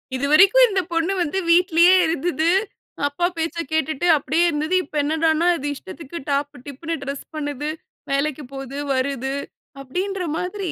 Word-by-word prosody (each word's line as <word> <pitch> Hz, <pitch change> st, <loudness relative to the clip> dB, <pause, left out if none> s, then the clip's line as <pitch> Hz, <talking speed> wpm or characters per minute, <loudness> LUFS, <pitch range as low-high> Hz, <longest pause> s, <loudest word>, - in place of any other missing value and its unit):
"இதுவரைக்கும் 365 Hz, -, +6 dB
இந்த 390 Hz, -2 st, +1 dB
பொண்ணு 335 Hz, +3 st, +1 dB
வந்து 345 Hz, +3 st, -1 dB
வீட்லயே 345 Hz, +1 st, +5 dB
இருந்தது. 325 Hz, +1 st, 0 dB, 0.6 s
அப்பா 285 Hz, +5 st, -1 dB
பேச்ச 325 Hz, +1 st, -2 dB, 0.2 s
கேட்டுட்டு 315 Hz, +2 st, 0 dB
அப்டியே 320 Hz, +4 st, +1 dB
இருந்தது. 310 Hz, +3 st, -1 dB
இப்ப 300 Hz, 0 st, -4 dB
என்னடான்னா 320 Hz, +2 st, +1 dB
அது 290 Hz, -, -4 dB
இஷ்டத்துக்கு 280 Hz, -, -9 dB
டாப், 285 Hz, +1 st, 0 dB
டிப்ன்னு 310 Hz, +4 st, -5 dB
டிரெஸ் 280 Hz, 0 st, -5 dB
பண்ணுது. 290 Hz, -1 st, -3 dB, 0.4 s
வேலைக்கு 295 Hz, +1 st, -1 dB
போது, 270 Hz, 0 st, -7 dB, 0.2 s
வருது." 270 Hz, 0 st, -1 dB, 0.5 s
அப்படீன்ற 365 Hz, +8 st, -3 dB
மாதிரி. 360 Hz, -1 st, -3 dB
315 Hz, 135 wpm, -22 LUFS, 280-345 Hz, 0.6 s, இதுவரைக்கும்